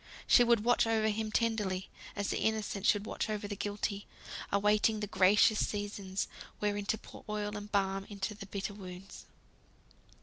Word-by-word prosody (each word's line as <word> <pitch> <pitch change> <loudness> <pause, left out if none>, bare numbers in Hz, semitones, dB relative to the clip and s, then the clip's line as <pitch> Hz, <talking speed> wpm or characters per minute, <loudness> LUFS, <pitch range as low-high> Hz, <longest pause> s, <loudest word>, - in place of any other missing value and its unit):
She 245 - +7
would 235 -3 +3
watch 240 0 +4
over 220 -1 +2
him 215 0 -2
tenderly, 210 -5 0 0.3
as 205 -1 -2
the - - -1
Innocent 215 -2 0
should 205 -3 +3
watch 220 - -3
over 210 -1 -2
the 205 - -4
Guilty; 205 0 -3 0.4
awaiting 210 +2 +3
the 210 - -1
gracious 200 +2 +4
seasons, 200 -2 -3 0.3
wherein 205 -1 -1
to 220 - +1
pour - - -13
oil 210 0 -2
and 205 0 -7
balm 195 -1 +1
into 200 0 -3
the 200 -1 -9
bitter 200 +1 -4
wounds. 190 -1 -10
205 Hz, 165 wpm, -32 LUFS, 200-215 Hz, 0.4 s, She